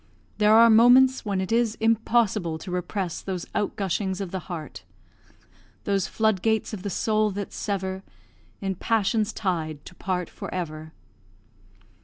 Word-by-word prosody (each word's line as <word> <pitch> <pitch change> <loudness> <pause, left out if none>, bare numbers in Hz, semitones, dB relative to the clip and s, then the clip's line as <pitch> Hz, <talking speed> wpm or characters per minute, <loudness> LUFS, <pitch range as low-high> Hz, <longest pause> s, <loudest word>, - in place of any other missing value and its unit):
There 210 +1 +5
are 230 0 +7
moments 250 +4 +6
when 200 -2 -1
it 190 +2 -3
is 230 -1 +2
impossible 220 -6 +1
to 180 +3 -8
repress 180 0 -3
those 185 -3 -4
outgushings 195 -2 -1
of 195 -3 -4
the 190 - -3
heart 160 -6 -7 1.0
"Those 200 -2 0
flood 220 -4 +1
gates 220 0 0
of 205 - -5
the 200 - -4
soul 215 +2 +1
that 200 0 -5
sever, 190 -2 -3 0.6
In 195 -1 -1
passion's 215 +2 0
tide 160 -8 -3
to - - -11
part 180 -2 -3
for - - -8
ever." 155 -3 -5
195 Hz, 145 wpm, -25 LUFS, 180-220 Hz, 1.0 s, are